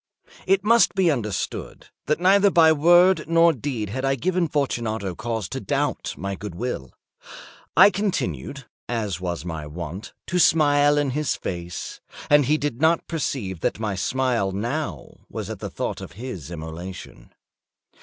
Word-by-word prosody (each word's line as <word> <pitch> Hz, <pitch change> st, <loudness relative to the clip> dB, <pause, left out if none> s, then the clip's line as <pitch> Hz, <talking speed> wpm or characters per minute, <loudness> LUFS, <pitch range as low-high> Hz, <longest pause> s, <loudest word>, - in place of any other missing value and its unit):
It 195 Hz, 0 st, +3 dB
must 230 Hz, 0 st, +4 dB
be 185 Hz, -4 st, +3 dB
understood, 110 Hz, -8 st, -4 dB, 0.2 s
that 150 Hz, +2 st, +1 dB
neither 200 Hz, +3 st, +5 dB
by 165 Hz, -3 st, +6 dB
word 175 Hz, +2 st, +5 dB
nor 165 Hz, 0 st, +5 dB
deed 120 Hz, -6 st, -4 dB
had 130 Hz, +4 st, -3 dB
I 135 Hz, 0 st, +2 dB
given 180 Hz, +6 st, 0 dB
Fortunato 115 Hz, -, -2 dB
cause 110 Hz, 0 st, -3 dB
to -, -, -4 dB
doubt -, -, -2 dB
my 100 Hz, +1 st, -4 dB
good 100 Hz, -2 st, -7 dB
will. 90 Hz, -, -4 dB, 0.9 s
I 205 Hz, -, +9 dB
continued, 140 Hz, -, -3 dB, 0.2 s
as 105 Hz, -7 st, -2 dB
was 85 Hz, -3 st, -4 dB
my 80 Hz, -3 st, -5 dB
wont, 85 Hz, +5 st, -7 dB
to 180 Hz, -, -1 dB
smile 145 Hz, -3 st, +4 dB
in 145 Hz, -2 st, +1 dB
his 150 Hz, +1 st, -1 dB
face, 85 Hz, -1 st, -6 dB, 0.3 s
and 145 Hz, -3 st, +6 dB
he 150 Hz, +2 st, +3 dB
did 145 Hz, -4 st, -3 dB
not 160 Hz, +1 st, +3 dB
perceive 125 Hz, -, -3 dB
that -, -, -1 dB
my 110 Hz, -2 st, -2 dB
smile 120 Hz, 0 st, 0 dB
now 120 Hz, +11 st, -4 dB
was -, -, -5 dB
at -, -, -7 dB
the -, -, -5 dB
thought -, -, -4 dB
of -, -, -9 dB
his 100 Hz, -, -7 dB
immolation. 85 Hz, -4 st, -8 dB
130 Hz, 155 wpm, -23 LUFS, 95-160 Hz, 0.9 s, I